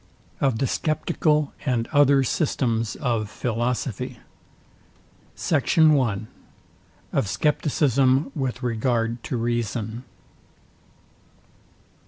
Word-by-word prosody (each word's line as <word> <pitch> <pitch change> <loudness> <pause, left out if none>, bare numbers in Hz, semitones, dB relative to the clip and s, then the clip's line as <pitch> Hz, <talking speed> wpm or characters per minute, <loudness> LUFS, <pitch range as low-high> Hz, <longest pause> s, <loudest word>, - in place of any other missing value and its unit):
OF 135 -5 +1
THE 135 - 0
SCEPTICAL 155 0 0
AND 120 -5 0
OTHER 140 -2 +5
SYSTEMS 115 -5 0
OF 115 -6 -1
PHILOSOPHY. 120 0 -2 1.2
SECT. 150 -2 0
I. 140 -10 +5 1.0
OF - - +1
SCEPTICISM 135 - +2
WITH 130 -2 -3
REGARD 115 0 0
TO 125 - -3
REASON. 115 0 -2
125 Hz, 80 wpm, -24 LUFS, 115-140 Hz, 1.2 s, OTHER